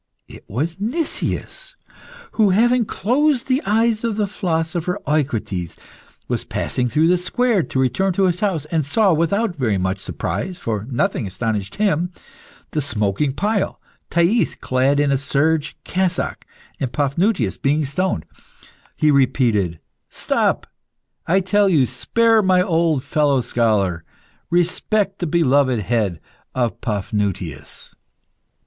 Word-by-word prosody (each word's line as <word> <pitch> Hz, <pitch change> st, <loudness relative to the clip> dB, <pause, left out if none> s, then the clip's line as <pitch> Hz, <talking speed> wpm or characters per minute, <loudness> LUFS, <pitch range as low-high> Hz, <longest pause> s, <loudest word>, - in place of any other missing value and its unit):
It -, -, -13 dB
was 155 Hz, -, -3 dB
Nicias, 335 Hz, -, -3 dB, 0.6 s
who, 215 Hz, -3 st, +3 dB
having 235 Hz, +5 st, +3 dB
closed 260 Hz, +6 st, +1 dB
the 260 Hz, +2 st, +1 dB
eyes 225 Hz, +1 st, +2 dB
of 225 Hz, -3 st, -1 dB
the 210 Hz, -, +2 dB
philosopher 175 Hz, -1 st, -2 dB
Eucrites, 115 Hz, -, -1 dB, 0.5 s
was -, -, -2 dB
passing 125 Hz, -1 st, -2 dB
through 155 Hz, +5 st, +3 dB
the 180 Hz, +1 st, +3 dB
square 235 Hz, +3 st, +1 dB
to 135 Hz, -, -3 dB
return 130 Hz, +10 st, +1 dB
to 195 Hz, -, +1 dB
his 180 Hz, -2 st, +1 dB
house, 190 Hz, -8 st, -1 dB
and 160 Hz, -2 st, +1 dB
saw, 190 Hz, +7 st, +2 dB
without 180 Hz, +5 st, 0 dB
very 115 Hz, -, 0 dB
much 95 Hz, +1 st, -1 dB
surprise 180 Hz, -, -4 dB
(for 110 Hz, -1 st, -3 dB
nothing 135 Hz, -, 0 dB
astonished 100 Hz, +1 st, -3 dB
him), 185 Hz, -5 st, +1 dB, 0.6 s
the 155 Hz, -, 0 dB
smoking 120 Hz, +1 st, 0 dB
pile, 205 Hz, +5 st, -1 dB, 0.3 s
Thais 170 Hz, +7 st, +2 dB
clad 130 Hz, +2 st, +1 dB
an 145 Hz, -1 st, +2 dB
a 135 Hz, -, +2 dB
serge 150 Hz, +2 st, 0 dB
cassock, 180 Hz, -1 st, -2 dB, 0.3 s
and 130 Hz, -3 st, -2 dB
Paphnutius 145 Hz, -, 0 dB
being 150 Hz, +2 st, +1 dB
stoned. 140 Hz, -, -1 dB, 0.7 s
He 150 Hz, -, +3 dB
repeated 120 Hz, -, +2 dB, 0.3 s
"Stop, -, -, 0 dB, 0.6 s
I 190 Hz, +4 st, +3 dB
tell 200 Hz, +2 st, +3 dB
you; 150 Hz, -8 st, +4 dB
spare 230 Hz, -, +2 dB
my 185 Hz, -2 st, +3 dB
old 165 Hz, -6 st, +1 dB
fellow 145 Hz, -4 st, +2 dB
scholar; 105 Hz, -8 st, 0 dB, 0.5 s
respect 190 Hz, +4 st, 0 dB
the 175 Hz, -, -2 dB
beloved 140 Hz, -7 st, +2 dB
head 100 Hz, -5 st, -1 dB, 0.4 s
of 120 Hz, -3 st, -1 dB
Paphnutius!" 100 Hz, -, -3 dB
155 Hz, 130 wpm, -20 LUFS, 125-195 Hz, 0.7 s, you